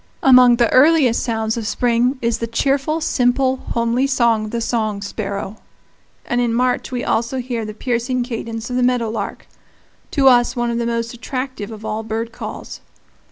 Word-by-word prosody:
Among 250 -2 +7
the 235 -1 +3
earliest 275 -3 +5
sounds 225 -1 -1
of 225 -2 -3
spring 245 +3 +1
is 230 -1 0
the 230 - -2
cheerful, 275 +6 0
simple, 260 -1 +1
homely 235 +2 -1
song 235 -5 +2
of - - -6
the 235 - -3
song 215 -3 -2
sparrow; 200 0 -5 0.7
and 240 0 0
in 235 -1 0
March 250 +2 0
we 250 -1 -3
also 235 +3 -1
hear 240 -3 -3
the 215 0 -7
piercing 245 +2 -1
cadence 230 -1 -5
of 250 - -1
the - - +1
meadow 245 -3 +1
lark 210 -3 -5 0.6
to 275 -2 +2
us 245 -1 +4
one 240 -1 -1
of 235 - -2
the 235 - -1
most 230 0 -2
attractive 255 -2 -5
of 220 -1 -9
all 215 0 -2
bird 225 +1 -4
calls. - - -8
235 Hz, 180 wpm, -19 LUFS, 225-255 Hz, 0.7 s, Among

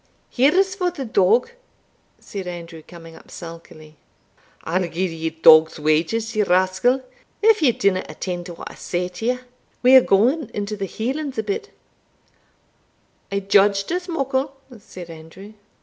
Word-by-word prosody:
"Here 270 +6 +3
is 385 0 +3
for 365 -2 -1
the 330 -7 -6
dog." 220 - +2 0.7
said 195 -3 -7
Andrew, 170 -2 -8
coming 165 0 -13
up - - -17
sulkily. 155 -2 -11 0.7
"I'll 175 +1 -1
gie 175 +3 -2
you 160 0 -2
dog's 160 0 +5
wages, 165 +10 0
ye 215 - +2
rascal, 190 +7 +2 0.4
if 440 -3 +5
ye 275 -5 +5
dinna 195 -4 0
attend 175 -2 -5
to 175 - -8
what - - -9
I - - -12
say 180 0 -3
t'ye 230 +7 -2 0.5
We 255 +1 +7
are 260 - +10
gaun 245 +7 +2
into 205 +1 -3
the 200 -1 -4
Hielands 265 - -4
a 220 - -1
bit" 215 - -4 1.6
"I 200 0 -1
judged 200 +1 +3
as 360 +1 -2
muckle," 275 -3 -2 0.2
said 180 -4 -11
Andrew. 165 +6 -12
200 Hz, 150 wpm, -21 LUFS, 175-260 Hz, 1.6 s, are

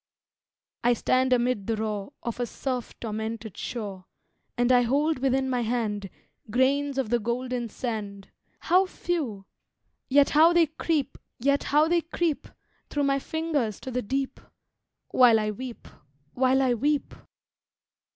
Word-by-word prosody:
I 245 +1 +5
stand 255 +2 +1
amid 245 -5 +1
the 225 - +1
roar 215 0 -3
Of 235 0 -4
a 245 - -1
surf 250 0 -4
tormented 220 -1 -4
shore, 200 -6 -5 0.5
And 245 +1 +3
I 250 -1 +6
hold 285 +5 +1
within 265 0 +1
my 250 -2 0
hand 220 -4 -2 0.4
Grains 275 +4 +1
of 260 -5 -1
the 240 - +3
golden 240 +1 -2
sand 205 -4 -5 0.3
How 370 +2 +3
few! 285 - -3 0.6
yet 280 +1 +5
how 320 +3 +6
they 345 -1 +5
creep 310 -2 -1 0.3
Through 300 +2 0
my 275 0 +2
fingers 295 - -2
to 260 - -6
the 250 +1 -1
deep, 270 +4 -2 0.7
While 240 -3 +6
I 215 0 -1
weep 245 +2 -8 0.5
while 260 +1 +3
I 255 -2 +3
weep! 285 +5 0
255 Hz, 130 wpm, -27 LUFS, 225-280 Hz, 0.7 s, I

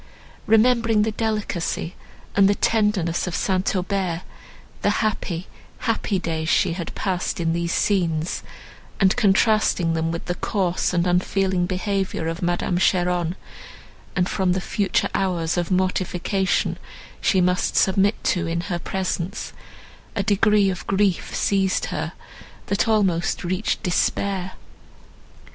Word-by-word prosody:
Remembering 225 -1 +4
the 220 - 0
delicacy 210 -6 -2 0.4
and 195 -1 +5
the 205 - +3
tenderness 205 -8 +1
of 180 - -3
St. 190 0 0
Aubert, 185 -2 -1 0.6
the - - +2 0.2
happy, 185 -4 -2 0.3
happy 225 -4 -1
days 160 -3 -2
she 165 - +3
had 170 -1 -6
passed 185 -3 -2
in 165 -1 +1
these 170 0 -1
scenes, 170 -6 0 0.6
and 190 -2 +4
contrasting 210 -5 +3
them 165 0 0
with 165 - -5
the 175 - -1
coarse 180 -1 -1
and 175 -1 +1
unfeeling 180 0 +1
behaviour 190 -3 -2
of 165 +1 -3
Madame 175 0 0
Cheron, 180 -2 +1 0.8
and 180 0 +2
from 185 -2 +1
the 185 - 0
future 200 +2 0
hours 175 -4 0
of 175 -2 -1
mortification 185 +1 0 0.4
she 190 - +3
must 180 0 +1
submit 195 +2 +3
to 175 - +1
in 170 +1 -1
her 175 -1 -3
presence—a 190 +2 -5
degree 205 -1 +3
of 180 - -7
grief 195 -2 +1
seized 195 -2 +1
her, 160 +2 -3 0.5
that 200 +3 0
almost 195 -6 +1
reached 185 +6 -1
despair. 185 0 0
185 Hz, 125 wpm, -23 LUFS, 175-200 Hz, 0.8 s, and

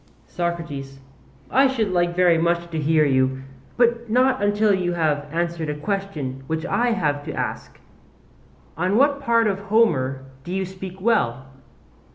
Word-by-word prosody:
SOCRATES: 160 -6 -4 0.5
I 270 +1 +5
should 225 -7 -1
like 175 -1 +1
very 175 -2 +4
much 170 +1 0
to 160 - -2
hear 155 +1 +3
you, 130 -1 +1 0.3
but 235 -1 +2
not 255 +1 +2
until 205 +1 +2
you 180 -2 0
have 150 -3 0
answered 170 -1 -2
a 150 - -2
question 150 -6 -4
which 160 +1 -2
I 240 +7 +1
have 145 -8 -1
to - - -5
ask. - - -5 1.0
On 185 +6 0
what 280 +2 +3
part 230 -4 +3
of 195 -2 0
Homer 165 - +1 0.2
do 175 - -7
you 190 0 -1
speak 190 0 -9
well? 135 - +1
175 Hz, 155 wpm, -22 LUFS, 150-210 Hz, 1.0 s, I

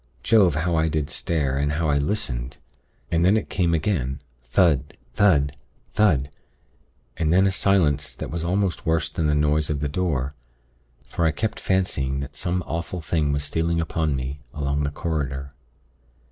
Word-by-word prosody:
Jove! 95 -9 +4
how 85 +3 0
I 80 0 +2
did 75 -2 -1
stare, 70 -5 0
and 75 +1 0
how 80 +2 0
I 70 -1 +2
listened. 70 - -2 0.5
And 85 0 +2
then 95 +5 +5
it 110 - -4
came 85 -3 +2
again 75 -6 -1 0.2
thud, 70 +1 +2 0.2
thud, 70 -8 +3 0.4
thud, 75 -10 +2 0.9
and 80 -2 +1
then 95 +3 +5
a 95 - +3
silence 80 -7 +2
that - - -6
was 85 0 -3
almost 95 +1 0
worse 80 -2 +1
than 80 - 0
the 75 - +2
noise 75 +1 +2
of 75 -2 -1
the 75 - -1
door; 70 -4 -1 0.7
for 85 - -1
I - - +3
kept 110 +7 -3
fancying 70 -8 0
that 70 - -7
some 90 0 -1
awful 85 +2 -4
thing 75 -2 0
was 70 0 -1
stealing 85 +2 0
upon 80 -3 0
me 65 +2 -4 0.2
along 70 0 -1
the 75 - 0
corridor. 70 -4 -3
80 Hz, 170 wpm, -24 LUFS, 70-85 Hz, 0.9 s, then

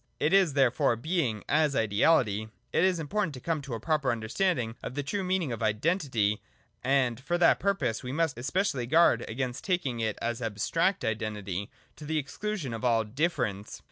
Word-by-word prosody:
It 150 +5 +1
is 190 -6 +5
therefore 130 -3 +3
Being 125 - -1
as 150 -2 +2
Ideality. 110 -1 +2
— - - -43
It - - +4
is 185 -2 +2
important 165 0 -1
to - - -8
come 160 +3 -2
to 140 -4 -5
a - - -5
proper 150 +1 +1
understanding 120 - -1
on 125 - -6
the 145 - -2
true 195 +8 -2
meaning 185 -6 0
of 115 -2 -4
Identity: 110 - +1 0.4
and, 130 -3 +2
for 175 +6 -1
that 175 - +4
purpose, 195 - 0
we 125 - -5
must 160 0 0
especially 130 -1 -1
guard 165 +6 +4
against 125 +2 -3
taking 160 -11 -1
it 110 -2 -1
as 120 +1 -2
abstract 120 - 0
Identity, 105 -3 -3 0.3
to 150 - -9
the 155 +1 -1
exclusion 150 - -3
of 115 - -6
all 115 -2 +3
Difference. 110 - -2
130 Hz, 180 wpm, -29 LUFS, 115-165 Hz, 0.4 s, is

